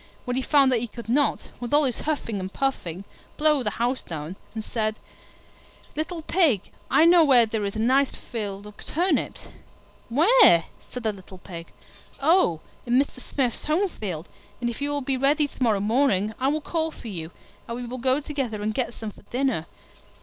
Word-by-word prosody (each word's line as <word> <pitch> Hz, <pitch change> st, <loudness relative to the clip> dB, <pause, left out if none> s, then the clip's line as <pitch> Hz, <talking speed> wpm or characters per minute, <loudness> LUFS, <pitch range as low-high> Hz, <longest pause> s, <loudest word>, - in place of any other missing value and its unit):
When 250 Hz, -1 st, -1 dB
he 260 Hz, -, +1 dB
found 275 Hz, -1 st, +4 dB
that 245 Hz, -, +3 dB
he 240 Hz, -, -3 dB
could 235 Hz, +1 st, -10 dB
not, 280 Hz, +4 st, +1 dB
with 240 Hz, +3 st, 0 dB
all 300 Hz, -, +5 dB
his 255 Hz, -4 st, 0 dB
huffing 265 Hz, -9 st, -2 dB
and 190 Hz, 0 st, -5 dB
puffing, 195 Hz, -10 st, -2 dB, 0.3 s
blow 300 Hz, -2 st, +3 dB
the 215 Hz, -, 0 dB
house 240 Hz, +5 st, -1 dB
down, 160 Hz, +2 st, -6 dB, 0.2 s
he 220 Hz, -, -2 dB
said, 215 Hz, -1 st, -2 dB, 1.0 s
"Little 315 Hz, +2 st, -3 dB
Pig, 300 Hz, -, +2 dB, 0.2 s
I 320 Hz, -, +5 dB
know 340 Hz, 0 st, +7 dB
where 255 Hz, -6 st, +6 dB
there 220 Hz, -1 st, -2 dB
is 200 Hz, -, -3 dB
a -, -, -3 dB
nice 260 Hz, +4 st, +3 dB
field 205 Hz, -3 st, -6 dB
of 210 Hz, 0 st, -12 dB
turnips." 355 Hz, +4 st, 0 dB, 0.6 s
"Where?" 330 Hz, -, +6 dB, 0.3 s
said 250 Hz, -, -6 dB
the 220 Hz, -1 st, 0 dB
little 190 Hz, -1 st, -12 dB
Pig. 170 Hz, -2 st, -9 dB, 0.5 s
"Oh, 280 Hz, -, +3 dB, 0.3 s
in 245 Hz, +2 st, +4 dB
Mr. 275 Hz, -2 st, -2 dB
Smith's 250 Hz, -4 st, -2 dB
home 350 Hz, +6 st, +2 dB
field; 180 Hz, -, -5 dB, 0.3 s
and 240 Hz, -1 st, -1 dB
if 235 Hz, -, -9 dB
you 285 Hz, -, 0 dB
will 290 Hz, 0 st, -1 dB
be 265 Hz, 0 st, 0 dB
ready 290 Hz, +3 st, +3 dB
to 275 Hz, -, -17 dB
morrow 220 Hz, -5 st, +3 dB
morning, 215 Hz, -1 st, +2 dB
I 260 Hz, -, +1 dB
will 305 Hz, +2 st, +1 dB
call 320 Hz, +1 st, -1 dB
for 280 Hz, -, -11 dB
you, 165 Hz, -6 st, -5 dB, 0.4 s
and 235 Hz, -, -4 dB
we 245 Hz, -, -5 dB
will 250 Hz, +2 st, -6 dB
go 260 Hz, +3 st, +2 dB
together 270 Hz, -8 st, -3 dB
and 215 Hz, +1 st, -1 dB
get 240 Hz, -1 st, -2 dB
some 220 Hz, -2 st, -6 dB
for -, -, -18 dB
dinner." 250 Hz, -, 0 dB
245 Hz, 195 wpm, -25 LUFS, 210-285 Hz, 1.0 s, know